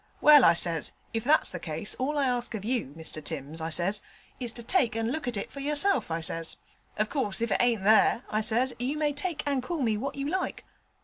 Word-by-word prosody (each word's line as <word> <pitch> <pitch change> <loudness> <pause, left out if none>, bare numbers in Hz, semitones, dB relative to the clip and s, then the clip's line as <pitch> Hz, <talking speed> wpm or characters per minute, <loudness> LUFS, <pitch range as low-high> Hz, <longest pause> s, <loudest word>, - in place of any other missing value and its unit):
"Well," 295 -3 +8
I 170 - +6
says, 165 -2 -1 0.2
"if 225 -1 -2
that's 300 +5 +3
the 180 - -5
case, 160 +4 -3
all 290 +4 -1
I 280 - +2
ask 245 -2 -1
of 205 -1 -6
you, 235 - -1
Mr 160 -1 -4
Timms," 155 +1 -6
I 160 - -2
says, 185 +6 -1 0.4
"is 245 -3 -1
to 235 - -6
take 240 - +2
and 225 +1 -1
look 305 -2 -4
at 240 -4 -2
it - - -5
for 280 - -8
yourself," 290 - +2
I 165 0 -2
says. 165 0 -4 0.4
"Of 215 0 +1
course 215 -7 0
if 230 0 -1
it - - +2
ain't 235 -5 +2
there," 220 +3 +4
I 215 - +1
says, 235 +4 +1
"you 265 +5 -2
may 300 -1 +1
take 300 +1 -2
and 280 -2 0
call 305 +2 -3
me 220 -3 +1
what 270 +6 -4
you 280 0 -3
like." 370 +4 -3
235 Hz, 240 wpm, -28 LUFS, 195-280 Hz, 0.4 s, Well